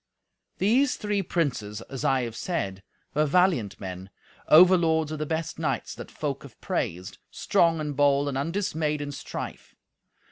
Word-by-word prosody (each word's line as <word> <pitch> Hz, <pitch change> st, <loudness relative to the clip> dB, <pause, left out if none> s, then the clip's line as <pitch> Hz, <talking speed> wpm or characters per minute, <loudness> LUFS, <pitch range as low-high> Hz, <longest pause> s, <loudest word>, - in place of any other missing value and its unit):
These 250 Hz, +7 st, +3 dB
three 210 Hz, -1 st, -1 dB
princes, 125 Hz, -, -2 dB
as 135 Hz, -2 st, -7 dB
I 130 Hz, -1 st, +2 dB
have 115 Hz, -2 st, -5 dB
said, 100 Hz, -, -3 dB, 0.3 s
were 150 Hz, +1 st, +2 dB
valiant 145 Hz, -, +2 dB
men, 95 Hz, -1 st, -7 dB, 0.4 s
overlords 160 Hz, -2 st, +6 dB
of 155 Hz, -, -4 dB
the 155 Hz, -, -2 dB
best 160 Hz, 0 st, -3 dB
knights 135 Hz, -7 st, -2 dB
that -, -, -9 dB
folk -, -, -4 dB
have -, -, -14 dB
praised, 90 Hz, +2 st, -3 dB
strong 165 Hz, -1 st, +2 dB
and 150 Hz, -2 st, -3 dB
bold 145 Hz, 0 st, +3 dB
and 140 Hz, -, -2 dB
undismayed 155 Hz, -1 st, -1 dB
in 145 Hz, 0 st, -4 dB
strife. 140 Hz, -, -7 dB
150 Hz, 150 wpm, -26 LUFS, 130-170 Hz, 0.4 s, overlords